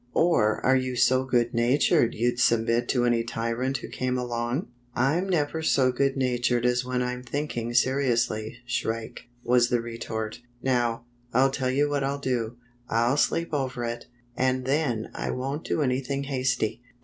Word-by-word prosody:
" 125 - -35 0.2
Or 110 -8 +2
are 130 - +5
you 130 -1 0
so 130 +2 +3
good 120 -2 +1
natured 120 0 +3
you'd 120 +2 0
submit 115 +1 +2
to 125 -2 +2
any 120 -1 +2
tyrant 115 +3 -2
who - - -8
came 130 0 -2
along?" 120 +4 -2
" - - -35
I'm 155 +10 +1
never 160 -2 0
so 135 -5 +3
good 135 +2 0
natured 125 -2 +1
as 125 0 +2
when 125 0 -1
I'm 125 0 -3
think 145 +4 -4
ing 120 0 -3
seriously. 120 -3 +1
Shrike," 115 -2 -3 0.2
was 120 0 +3
the 120 - +2
retort, 115 -2 -5 0.2
"Now, 120 -2 0 0.3
I'll 135 +2 +4
tell 130 -1 -1
you 140 +3 +2
what 145 -1 -1
I'll 140 +1 -1
do. 120 -4 -2 0.3
I'll 120 +4 +2
sleep 165 +2 0
over 130 -4 -2
it, 120 0 -4 0.3
and 130 0 0
then 130 -5 0
I - - -4
won't 135 +4 -3
do 155 - 0
anything 135 +1 -1
hasty." 130 -4 -1
125 Hz, 175 wpm, -26 LUFS, 120-135 Hz, 0.3 s, are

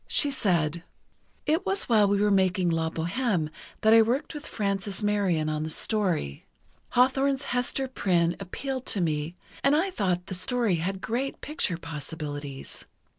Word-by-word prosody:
She 290 - +1
said: 170 - +1 0.6
"It 315 +4 +2
was 390 +1 0
while 215 -4 +4
we 200 0 +2
were 205 0 +3
making 185 -2 +3
'La 165 0 0
Bohême' 175 0 -1 0.3
that 220 0 +5
I 225 - +8
worked 245 +9 0
with 295 0 -7
Frances 200 0 -2
Marion 195 -7 +1
on 155 0 -1
the 155 - -3
story. 170 - 0 0.5
Hawthorne's 270 +2 +3
Hester 250 +2 0
Prynne 175 -8 +1
appealed 260 +7 -5
to 205 - +1
me, 155 -1 -1 0.3
and 275 +1 +5
I 365 +5 +1
thought 180 - 0
the 190 - -6
story 200 +1 +1
had 190 +4 -3
great 255 +5 -2
picture 295 - -2
possibilities. 145 -3 -6
195 Hz, 155 wpm, -27 LUFS, 165-250 Hz, 0.6 s, I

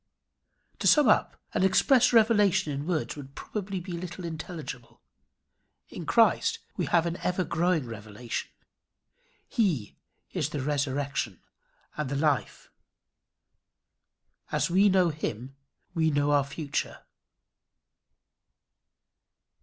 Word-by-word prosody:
To - - +1
sum 300 -4 +6
up: 215 - +2
An - - +1
express 210 +7 +4
revelation 205 -8 +4
in 140 +3 -4
words 170 -4 -1
would 140 -2 -10
probably 195 -2 -4
be 180 +1 -8
little 175 +1 -6
intelligible. 160 -6 -7 0.9
In - - -8
Christ - - +3 0.2
we - - -2
have 170 -1 +3
an 170 +1 -2
ever 180 0 -1
growing 170 -3 +1
revelation. 110 +1 -6 1.0
He 170 - 0 0.4
is - - -1
the 145 - -3
resurrection 140 0 -2 0.6
and 150 -3 -2
the 140 - -2
life. 145 -1 -1 1.8
As - - 0
we 195 +3 +5
know 185 -2 +4
him 135 -4 -5 0.4
we 160 -2 +2
know 145 -1 +1
our 145 -2 +3
future. 140 +1 -4
160 Hz, 110 wpm, -28 LUFS, 140-185 Hz, 1.8 s, sum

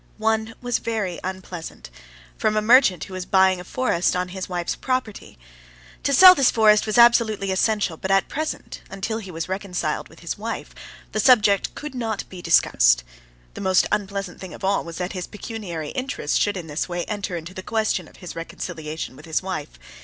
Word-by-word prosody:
One 220 0 0
was 245 -1 -1
very 215 -6 -3
unpleasant, 180 - -7 0.4
from 215 0 0
a - - +3
merchant 220 - +5
who 190 - -9
was 185 -1 -5
buying 190 -2 +4
a - - -7
forest 185 -5 0
on 180 0 -1
his 190 0 -6
wife's 175 -1 -2
property. 255 - -3 0.6
To 280 - 0
sell 365 +7 +10
this 275 -7 +4
forest 215 -1 +4
was 215 - 0
absolutely 225 -4 +5
essential; 195 -3 +1
but 190 - -5
at 195 0 +3
present, 310 +1 -5
until 195 +4 -3
he 195 -4 -9
was 165 -2 -5
reconciled 185 -5 -3
with 160 - -17
his 170 +3 -5
wife, 225 +2 -5 0.4
the 215 - -2
subject 210 -4 +4
could 300 -1 -7
not 225 -5 -3
be 185 -2 -9
discussed. - - +4 0.5
The - - -8
most 190 -1 +3
unpleasant 200 -2 -3
thing 185 -2 -8
of - - -14
all 195 +1 +1
was 170 -1 -8
that 180 +1 -3
his 180 -2 -5
pecuniary 200 - -6
interests 255 - -3
should 205 -1 +1
in 175 - -6
this 155 +3 -3
way 175 0 -3
enter 205 -4 -3
into 170 +2 -8
the 185 - -6
question 220 +2 -1
of - - -18
his 180 - -9
reconciliation 160 -3 -6
with - - -13
his 160 +2 -1
wife. 155 - -5
195 Hz, 190 wpm, -23 LUFS, 175-220 Hz, 0.6 s, sell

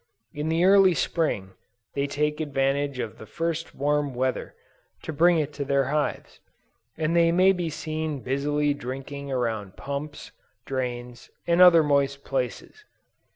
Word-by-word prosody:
In 150 +2 -3
the 165 +2 +2
early 195 -2 +6
Spring, 105 - -1 0.4
they 140 0 -1
take 150 +2 -1
advantage 140 -1 0
of 115 -4 -5
the 110 - -10
first 165 -1 -3
warm 145 -1 0
weather, 130 +1 -2 0.5
to 160 - -5
bring 170 +3 +4
it 150 -1 -1
to 140 - -3
their 140 -1 +1
hives, 150 -1 -2 0.6
and 160 +1 0
they 170 -1 +4
may 185 +3 +5
be 175 -3 -2
seen 155 -2 -4
busily 145 +3 0
drinking 140 +1 -6
around 110 -6 -2
pumps, 140 +2 -6 0.3
drains, 125 -2 -5 0.2
and 170 +1 +3
other 170 -3 +8
moist 140 -1 +1
places. 135 - -4
145 Hz, 145 wpm, -25 LUFS, 135-160 Hz, 0.6 s, other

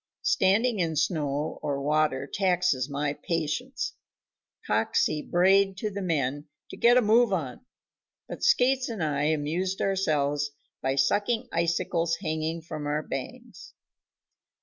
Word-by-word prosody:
Standing 215 +4 +2
in 165 -3 0
snow 150 -2 -1
or 140 -1 -2
water 150 -1 +1
taxes 180 -7 0
my 140 0 -1
patience. 210 - -3 0.7
Coxey 150 - +1
brayed 190 +3 +3
to 210 +2 -3
the 200 0 -5
men 145 -4 -1 0.2
to - - -7
"get 240 +1 +5
a 250 - +4
move 225 +1 +4
on," 155 - -3 0.6
but - - -8
Skates 255 +1 +3
and 220 -7 -3
I 145 -2 0
amused 160 +5 -1
ourselves 145 -7 0 0.3
by 135 0 0
sucking 205 - +1
icicles 170 0 0
hanging 160 -1 -3
from 155 -2 -6
our 150 +1 -1
bangs. - - -8
165 Hz, 125 wpm, -27 LUFS, 145-195 Hz, 0.7 s, get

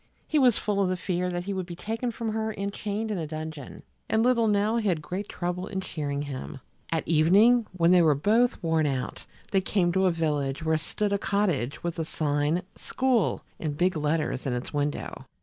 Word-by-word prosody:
He 310 - +2
was 250 -5 +5
full 205 -1 0
of 190 - +2
the 185 - -1
fear 180 0 -1
that 175 0 -3
he 200 +2 -3
would 185 -2 -3
be 175 - -7
taken 225 +7 -3
from 230 -1 -3
her 220 0 -1
and 200 -1 -4
chained 215 +2 -3
in 200 - -1
a 160 - -3
dungeon, 155 -2 -7 0.3
and 220 0 +3
little 235 -2 +3
Nell 210 +2 +2
had 190 -7 +1
great 180 +7 -5
trouble 180 +1 -3
in 190 - -3
cheering 145 -6 -3
him. 135 -2 -6 0.3
At 165 -1 -1
evening 200 +9 +5
when 170 -1 +3
they 180 -1 +7
were 155 -3 +4
both 225 - +2
worn 160 -2 +2
out, 130 -3 -3 0.3
they 195 - +3
came 185 -2 +1
to 190 +1 +3
a - - +3
village 150 -3 -1
where 160 0 +2
stood 205 +6 -2
a 200 - +1
cottage 190 -11 0
with 170 0 -3
the 165 - -1
sign 150 +2 0
SCHOOL 255 -6 0 0.2
in 155 -3 -2
big 180 +5 +1
letters 150 -3 -1
in 130 - 0
its 125 +4 -4
window. 145 0 -3
180 Hz, 210 wpm, -27 LUFS, 155-205 Hz, 0.3 s, they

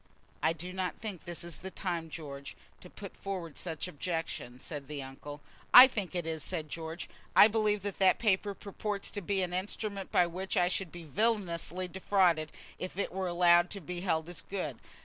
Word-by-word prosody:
"I 160 - +3
do 175 +3 -6
not 185 -1 -2
think 210 -6 -6
this 170 -1 -5
is 170 -2 -5
the 190 - -7
time, 170 -4 -3
George, 140 -3 -7 0.2
to 180 - -12
put 200 0 -9
forward 180 -6 -5
such 165 -1 -4
objections," 160 -7 -4
said 145 -3 -5
the 145 -2 -5
uncle. 145 +2 -9 0.3
"I 250 - +14
think 205 -8 -3
it 175 -2 -1
is," 160 -1 -2
said 160 -4 -4
George. 165 +1 -5 0.3
"I - - +10
believe 210 -2 +1
that 205 -2 -4
that 190 -1 +5
paper 200 -2 +1
purports 200 0 -4
to 205 - -4
be 195 +1 0
an 180 -1 -3
instrument 200 +1 -3
by 180 - +5
which 185 +3 -3
I 180 0 +4
should 185 -2 -2
be 175 -1 -9
villanously 185 -1 0
defrauded 180 -4 +2 0.3
if 185 0 -5
it 200 - -1
were 190 +1 -2
allowed 175 0 +5
to 200 - -4
be 180 0 -6
held 160 -4 0
as 175 -1 -6
good. 155 - -4
180 Hz, 195 wpm, -31 LUFS, 165-195 Hz, 0.3 s, I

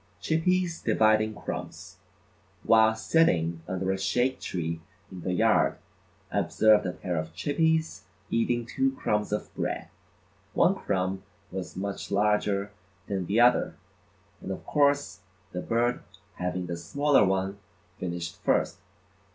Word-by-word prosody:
Chippies 170 +1 +1
Dividing 110 -1 +3
Crumbs: 105 - -7 0.7
While 110 0 +5
sitting 85 - +2
under 95 0 -1
a 95 - -2
shade 120 +7 +1
tree 85 -2 -3 0.3
in 90 - -8
the 90 - -2
yard, 90 - +3 0.5
I - - +1
observed 110 -3 +4
a - - -1
pair 90 -2 -3
of 80 +1 -4
Chippies 160 - 0 0.3
eating 120 +1 +1
two 265 - 0
crumbs 105 - -1
of 105 - -3
bread. - - -3 0.7
One - - +5
crumb 95 0 -2 0.3
was 95 -1 -6
much 100 +1 -4
larger 105 0 +1 0.3
than 95 -3 -3
the 105 +4 +2
other, 120 +1 +4 0.7
and - - -7
of 95 - -5
course 145 -1 +2 0.3
the 90 - -4
bird 120 +4 0 0.4
having 90 0 -2
the 85 -1 -4
smaller 140 - +3
one 95 +1 0 0.4
finished 85 -2 -5
first. - - +1
105 Hz, 130 wpm, -28 LUFS, 90-120 Hz, 0.7 s, While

